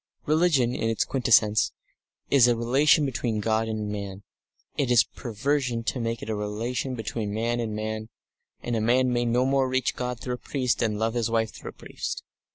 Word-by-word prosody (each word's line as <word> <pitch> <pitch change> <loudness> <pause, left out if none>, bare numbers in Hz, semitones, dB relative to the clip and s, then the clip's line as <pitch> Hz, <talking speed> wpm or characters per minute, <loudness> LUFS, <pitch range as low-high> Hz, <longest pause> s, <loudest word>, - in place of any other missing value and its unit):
Religion 150 -6 +3
in 115 - -1
its 115 - +1
quintessence 115 -5 +3 0.6
is 130 -4 +6
a 120 - +3
relation 135 +6 +3
between 120 -4 -2
God 110 +1 +1
and 110 -1 -3
man; 100 -1 -6 0.5
it 135 -3 0
is 120 -2 +6
perversion 125 0 -2
to 125 - -2
make 115 -1 -3
it - - -7
a - - 0
relation 115 +5 -3
between 110 -2 -4
man 115 +3 -1
and 110 -2 -3
man, 110 0 -4 0.5
and 120 - -2
a 110 - 0
man 125 +3 +3
may 120 0 +1
no 120 +2 +2
more 135 -1 +2
reach 130 -1 0
God 125 -1 -3
through 125 - -4
a - - -3
priest 125 -2 -1
than 110 -3 0
love 110 +1 0
his 120 -1 0
wife 115 -1 0
through - - -8
a - - -11
priest. - - -6
115 Hz, 195 wpm, -26 LUFS, 110-125 Hz, 0.6 s, is